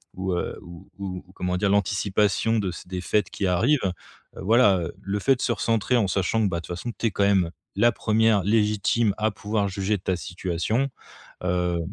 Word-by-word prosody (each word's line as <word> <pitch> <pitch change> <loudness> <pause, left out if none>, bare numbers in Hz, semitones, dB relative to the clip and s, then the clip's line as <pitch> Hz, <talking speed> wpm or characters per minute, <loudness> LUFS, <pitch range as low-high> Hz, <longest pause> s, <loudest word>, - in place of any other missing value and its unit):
ou 95 0 -2
heu, 85 - -3
ou 85 -1 -12
ou 95 -2 -5
comment 90 0 -2
dire? 100 +1 +1
L'anticipation 100 +2 +1
de 95 -3 -1
ç 85 - -10
des 90 0 -4
fêtes 105 +3 0
qui 100 - -2
arrivent, 115 +12 +3
heu, 90 -1 -8
voilà, 105 -1 +4
heu, 80 - -4
le 100 +2 -2
fait 135 +6 +3
de - - -8
se 120 - +1
recentrer 115 +2 0
en 110 -4 +2
sachant 95 +4 +1
que, 100 - +2
bah, 85 - -2
de 85 - -9
toute 90 - -4
façon, 120 +7 -5
tu - - -3
es - - -1
quand 100 - 0
même 95 -4 +3 0.2
la 115 +4 +4
1re 110 -2 +2
légitime 105 +1 +2
à 110 0 +1
pouvoir 105 0 -1
juger 100 +2 -1
de - - -15
ta 95 - 0
situation. 90 +9 -2 0.5
Hem, 90 -1 0
100 Hz, 210 wpm, -25 LUFS, 90-110 Hz, 0.5 s, voilà